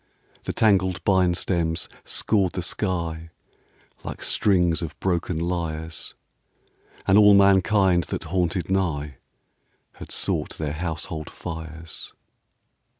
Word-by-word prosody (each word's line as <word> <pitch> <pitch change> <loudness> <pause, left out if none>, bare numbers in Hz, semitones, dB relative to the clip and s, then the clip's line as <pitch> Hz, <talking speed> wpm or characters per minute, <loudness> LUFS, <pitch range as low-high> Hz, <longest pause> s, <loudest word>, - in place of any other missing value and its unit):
The - - -1
tangled 95 -4 +2
bine 95 -3 +3
stems 85 -3 -1 0.2
scored 95 -5 +1
the 90 - -3
sky 85 -4 -2 0.7
Like - - -6
strings 90 -5 +2
of 75 -3 -6
broken 90 -2 -1
lyres, 80 -2 -3 0.9
And 95 +2 +5
all 105 -1 +8
mankind 95 -2 +4
that - - -4
haunted 90 0 -1
nigh 75 -8 -1 0.8
Had - - -10
sought - - -1
their 75 -2 -3
household 80 -1 -4
fires. 80 -1 -7
85 Hz, 105 wpm, -24 LUFS, 80-95 Hz, 0.9 s, all